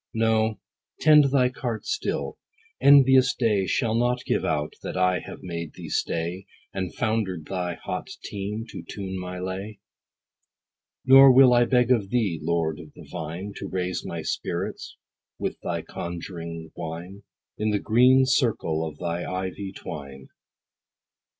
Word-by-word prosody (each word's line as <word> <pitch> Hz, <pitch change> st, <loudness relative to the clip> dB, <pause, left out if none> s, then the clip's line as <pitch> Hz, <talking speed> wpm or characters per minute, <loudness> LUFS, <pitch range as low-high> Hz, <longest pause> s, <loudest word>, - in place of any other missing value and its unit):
No, 110 Hz, -1 st, +1 dB, 0.4 s
tend 150 Hz, -2 st, +7 dB
thy 135 Hz, -2 st, +3 dB
cart 120 Hz, -3 st, -4 dB
still. -, -, -3 dB, 0.4 s
Envious 130 Hz, -2 st, +6 dB
day 105 Hz, -6 st, +1 dB
Shall 115 Hz, -4 st, 0 dB
not 120 Hz, +2 st, 0 dB
give -, -, 0 dB
out 75 Hz, -1 st, -1 dB
that -, -, -5 dB
I 90 Hz, 0 st, +2 dB
have -, -, -10 dB
made 85 Hz, -3 st, -5 dB
thee -, -, -8 dB
stay, 85 Hz, +4 st, -2 dB, 0.3 s
And 95 Hz, -2 st, -3 dB
founder'd 105 Hz, -8 st, -1 dB
thy 90 Hz, -1 st, -3 dB
hot -, -, -5 dB, 0.2 s
team, 105 Hz, +3 st, -4 dB
to -, -, -7 dB
tune 95 Hz, -2 st, -5 dB
my 90 Hz, 0 st, -6 dB
lay. 95 Hz, +3 st, -5 dB, 1.3 s
Nor 135 Hz, +1 st, +9 dB
will 130 Hz, -1 st, +7 dB
I 120 Hz, 0 st, +5 dB
beg 125 Hz, 0 st, +2 dB
of 105 Hz, -6 st, +2 dB
thee, 105 Hz, -9 st, 0 dB
Lord 80 Hz, -1 st, -1 dB
of 75 Hz, -, -12 dB
the -, -, -13 dB
vine, 85 Hz, +6 st, -5 dB
To -, -, -5 dB
raise 90 Hz, -1 st, -2 dB
my -, -, -5 dB
spirits -, -, -4 dB, 0.4 s
with -, -, -4 dB
thy -, -, -3 dB
conjuring 85 Hz, -2 st, -7 dB
wine, 85 Hz, +5 st, -7 dB, 0.4 s
In 105 Hz, 0 st, +1 dB
the 105 Hz, -, +2 dB
green 125 Hz, +5 st, +5 dB
circle 115 Hz, -, +1 dB
of 75 Hz, -2 st, -6 dB
thy 85 Hz, +2 st, -3 dB
ivy 95 Hz, +1 st, -4 dB
twine. 70 Hz, -7 st, -9 dB
95 Hz, 145 wpm, -25 LUFS, 85-120 Hz, 1.3 s, Nor